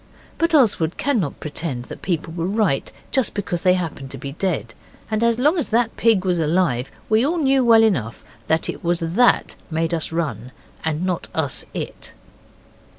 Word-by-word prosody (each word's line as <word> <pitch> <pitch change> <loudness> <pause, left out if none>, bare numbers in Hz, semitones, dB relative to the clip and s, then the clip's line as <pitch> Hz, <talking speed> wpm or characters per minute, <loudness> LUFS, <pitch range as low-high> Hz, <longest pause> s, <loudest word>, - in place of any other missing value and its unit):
But 335 -1 +2
Oswald 200 - +3
cannot 225 - 0
pretend 145 -5 -4
that - - -10
people 165 -2 -2
were 170 0 -2
right 200 -8 0 0.2
just 265 -5 +1
because 180 -4 -2
they 180 -1 +4
happen 160 -6 -4
to 135 - -7
be 135 +2 -6
dead, 155 -7 -2 0.4
and 215 +1 +1
as 235 -1 +3
long 300 +8 +3
as 300 - -2
that 230 0 +1
pig 220 -5 +3
was 180 -2 +1
alive 155 -6 +1 0.2
we 220 +2 +3
all 325 +6 +1
knew 270 -4 +3
well 225 -2 +6
enough 125 - 0 0.2
that 160 0 +1
it - - -5
was 170 0 0
it 165 0 -3
that 245 +2 +4
made 165 +1 -1
us 160 -1 -2
run 130 -8 -3 0.3
and 160 +2 -1
not 180 -2 -2
us 145 -5 -1
it. - - -6
175 Hz, 185 wpm, -21 LUFS, 160-225 Hz, 0.4 s, well